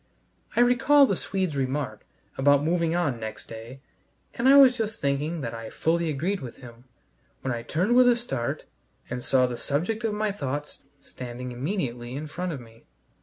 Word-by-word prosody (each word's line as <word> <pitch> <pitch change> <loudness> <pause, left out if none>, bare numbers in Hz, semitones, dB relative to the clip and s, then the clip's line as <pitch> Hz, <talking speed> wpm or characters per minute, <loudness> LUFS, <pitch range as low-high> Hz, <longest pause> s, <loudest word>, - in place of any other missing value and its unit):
I - - +4
recall 265 +4 +6
the 200 - 0
Swede's 185 -4 -2
remark 130 -5 -2 0.3
about 145 +1 +4
moving 165 +1 +1
on 145 -9 0
next 110 -1 -6
day, 115 +4 -9 0.5
and 245 +3 +2
I 280 - +8
was 265 -3 +8
just 220 -3 -3
thinking 145 +4 -1
that 115 -3 -4
I 115 -1 -6
fully 165 0 0
agreed 170 +7 -1
with 125 -3 -8
him, 120 -1 -13 0.6
when 130 - -1
I 120 - -3
turned 180 - +1
with 250 0 +7
a 240 - +5
start 235 - -3 0.5
and 125 0 -3
saw 130 -1 +3
the 125 -1 -3
subject 180 - -1
of 220 -2 0
my 215 0 0
thoughts 145 -7 -5 0.2
standing 125 -1 -7
immediately 125 - -3
in 150 +3 -4
front 175 +4 -4
of 145 - -5
me. 115 -1 -16
145 Hz, 180 wpm, -26 LUFS, 125-200 Hz, 0.6 s, I